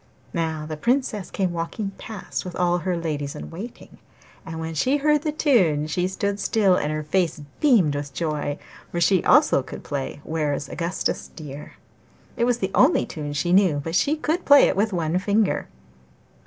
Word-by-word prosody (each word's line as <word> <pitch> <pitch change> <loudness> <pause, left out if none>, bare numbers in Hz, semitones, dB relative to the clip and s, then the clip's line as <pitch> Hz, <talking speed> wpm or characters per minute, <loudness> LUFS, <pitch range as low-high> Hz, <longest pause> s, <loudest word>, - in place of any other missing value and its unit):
Now 160 -3 -2
the 155 0 -5
Princess 235 - 0
came 185 -3 -1
walking 175 +5 -3
past 215 -3 -5
with 180 -2 -7
all 175 0 +1
her 175 +1 -1
ladies 150 -4 -3
in - - -8
waiting, 210 +9 -9 0.4
and 160 0 -7
when 160 0 -4
she 255 - +2
heard 300 0 +2
the 310 0 -1
tune 195 - +2
she 180 +4 -1
stood 200 +2 -2
still 200 -5 +3
and 150 -3 -1
her 155 0 -2
face 170 +1 0 0.2
beamed 220 - +4
with 145 0 -4
joy, 150 -2 -2 0.3
for 175 - -2
she 175 +1 +3
also 295 - +5
could - - -9
play 140 0 -4
'Where 155 -3 -1
is 140 - -5
Augustus 170 +5 -2
dear?' 150 -2 -9 0.6
It 235 - +1
was 245 -1 +2
the 195 -4 -2
only 280 +7 +4
tune 145 -2 -6
she 175 +5 0
knew, 185 -5 +5
but 145 - -3
that - - -2
she 285 - +3
could 315 +3 -1
play 285 -1 +6
with 210 +3 +1
one 170 -1 0
finger. 205 +2 +1
175 Hz, 185 wpm, -23 LUFS, 155-215 Hz, 0.6 s, play